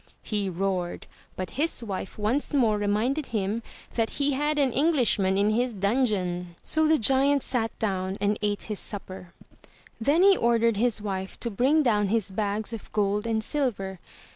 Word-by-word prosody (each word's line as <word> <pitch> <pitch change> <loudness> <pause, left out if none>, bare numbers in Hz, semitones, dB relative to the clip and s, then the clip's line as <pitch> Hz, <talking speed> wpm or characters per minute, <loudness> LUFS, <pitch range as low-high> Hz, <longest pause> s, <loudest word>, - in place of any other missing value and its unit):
'* - - -36
he 205 -3 -1
roared, 180 -1 -2 0.3
but 185 -1 -5
his 320 -6 0
wife 195 -3 -5
once 235 +8 -1
more 220 -6 +3
reminded 225 +8 0
him 215 0 -2 0.3
that 225 -1 0
he 285 0 +2
had 295 +2 0
an 270 -4 +2
Englishman 245 - +2
in 205 +2 +3
his 240 +1 0
dungeon, 190 -5 0
so 315 0 +1
the 315 0 +4
giant 270 +3 +3
sat 225 -3 -2
down 190 -2 -2
and 205 +1 0
ate 205 -1 -1
his 210 -2 -3
supper. 185 -3 -6 0.7
Then 290 +10 +3
he 395 0 +7
ordered 230 - +2
his 225 -1 +2
wife 190 -2 -4
to 235 - -2
bring 275 +9 +3
down 210 -5 +2
his 210 -1 0
bags 210 +2 -2
of 225 - -8
gold 205 +1 0
and 220 -1 0
silver. 205 -10 -2
215 Hz, 170 wpm, -26 LUFS, 195-255 Hz, 0.7 s, he